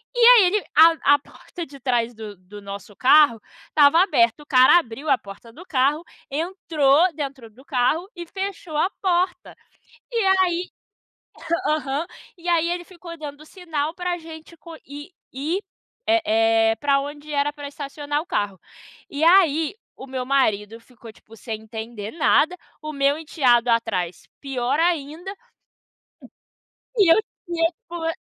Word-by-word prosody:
e - - -2
aí 475 -2 +8
ele, 405 +3 +1
a 320 -2 +6
a - - -2
porta 340 +3 -10
de 275 -1 -14
trás 245 -2 0
do 215 -2 -9
do 195 +3 -13
nosso 200 +1 -9
carro 265 -4 +5 0.3
estava 300 +3 +5
aberta, 265 - +1
o - - -22
cara 260 +2 +6
abriu 285 -1 -3
a 260 - +4
porta 205 +2 -13
do 355 +6 -13
carro, 285 +3 +1 0.3
entrou 320 0 +1
dentro 275 -6 -6
do 240 +5 -19
carro 305 +5 0
e 345 - -7
fechou 380 -3 -6
a 355 - +2
porta. 365 -1 -1 0.6
E 475 - -7 0.2
aí, 360 -1 0 1.0
aham, 300 +1 -1 0.3
e 350 0 -9
aí 340 0 +2
ele 350 0 -3
ficou 345 -2 -11
dando 300 -1 -9
sinal 320 -4 -4
para 355 0 -3
gente 320 0 -12 0.8
ir, 320 +9 -2 0.4
eh, 225 -8 +3
para 275 +3 +1
onde 290 +2 -8
era 290 0 0
para 290 -1 -8
estacionar 290 +1 -4
o 335 - -9
carro. 200 -2 -2 0.5
E 285 - -5
aí, 325 -2 +4 0.2
o - - -10
meu 260 -1 -4
marido 225 -5 0
ficou 230 -2 -15
tipo 225 +1 -18
sem 220 -1 -7
entender 220 -1 -7
nada, 335 +2 +2 0.3
o 305 0 -5
meu 280 0 +1
enteado 250 -7 +2
atrás 200 -7 -1
pior 265 -1 -2
ainda, 335 +2 -1 1.6
e 385 -7 +6
eu - - +5 0.3
tipo 335 0 -3
290 Hz, 145 wpm, -22 LUFS, 245-335 Hz, 1.6 s, aí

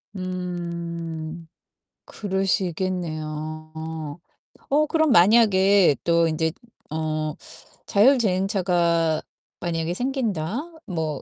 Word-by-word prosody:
음. 170 -3 -5 0.6
그러시겠네요. 165 -5 -2 1.0
어 300 +2 +4
그럼 315 -2 +2
만약에 200 - +5
또 170 -1 +3
인제 160 0 0 0.4
어 155 -1 -2 0.5
자율주행차가 185 - +3 0.4
만약에 165 0 -2
생긴다. 230 - -1 0.3
뭐 160 -6 -3
175 Hz, 160 characters per minute, -24 LUFS, 160-195 Hz, 1.0 s, 만약에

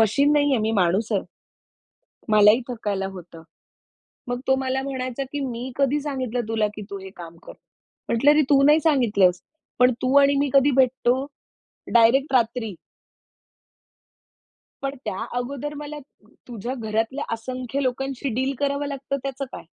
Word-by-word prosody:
Machine 280 +7 +3
नाहीये, 290 -4 +3
मी 220 +1 0
माणूस 195 +2 +1
आहे. 200 - +2 1.1
मलाही 210 +3 +6
थकायला 205 -5 -3
होतं. 170 -3 -11 0.9
मग 245 0 -2
तो 265 - +3
मला 265 0 -1
म्हणायचा, 260 -1 -4
की 290 - -3
"मी 255 -1 -4
कधी 280 +1 +1
सांगितलं 260 -4 -3
तुला, 220 -1 +1
की 210 - -7
तू 200 - -5
हे 190 0 -10
काम 170 -1 -10
कर." - - -9 0.6
म्हटलं 255 +6 +4
"अरे 300 +1 +4
तू 275 -1 +5
नाही 300 +2 +6
सांगितलंस. 215 - +3 0.4
पण 250 0 +6
तू 260 +2 +1
आणि 280 0 +4
मी 285 -1 +1
कधी 275 +1 +5
भेटतो? 260 0 +2 0.7
डायरेक्ट 255 +4 +4
रात्री." 230 -3 +1 2.1
पण 275 0 -3
त्या 190 - -4 0.2
अगोदर 280 +4 -4
मला 295 0 -7 0.5
तुझ्या 240 +1 -5
घरातल्या 225 +3 -2
असंख्य 255 +3 -4
लोकांशी 270 +2 -2
डील 265 +3 -1
करावं 280 0 0
लागतं 275 0 -4
त्याचं 275 0 -3
काय? - - -8
255 Hz, 145 wpm, -23 LUFS, 225-275 Hz, 2.1 s, मलाही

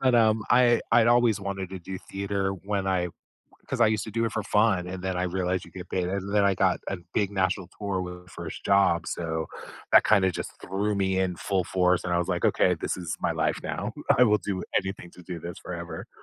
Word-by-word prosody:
but, 130 -2 +3
um, 110 -2 +4
I 120 -1 +5
I'd 115 -1 +6
always 120 -3 +4
wanted 95 -1 -4
to 95 - -6
do 95 +1 -6
theater 100 0 -2
when 100 -1 -1
I 90 -2 +1 0.6
'cause 130 -2 -3
I - - +7
used 110 -1 +1
to 110 - -7
do 115 +2 0
it 115 - -1
for 110 - -2
fun, 105 -4 +2
and 90 0 -6
then 95 -1 -1
I 90 - 0
realized 90 0 -1
you - - -14
get 90 -1 -9
paid, 90 -1 0
and 100 +2 -3
then 105 - +4
I 100 -1 +3
got 95 0 +2
a 95 - -2 0.2
big 100 -2 +1
national 95 -2 0
tour 100 -3 -2
with 90 0 -8
first - - -8
job, 95 -4 +3
so 80 -1 -2 0.5
that - - +8
kinda 95 -3 +4
just - - -6
threw 100 +3 -1
me 95 -1 +1
in 95 -2 0
full 95 -1 -1
force, 90 0 +2
and 90 - -4
I 85 - +3
was 90 - -1
like, 90 -2 +1
"Okay, - - +3
this - - -2
is 85 -4 -4
my - - +1
life - - 0
now. - - -3 0.3
I - - +7
will 105 -2 +4
do 95 0 -3 0.2
anything 95 -2 -6
to 90 - -14
do 90 -1 -6
this 85 +2 -7
forever." 85 -1 -7
95 Hz, 235 wpm, -27 LUFS, 90-105 Hz, 0.6 s, that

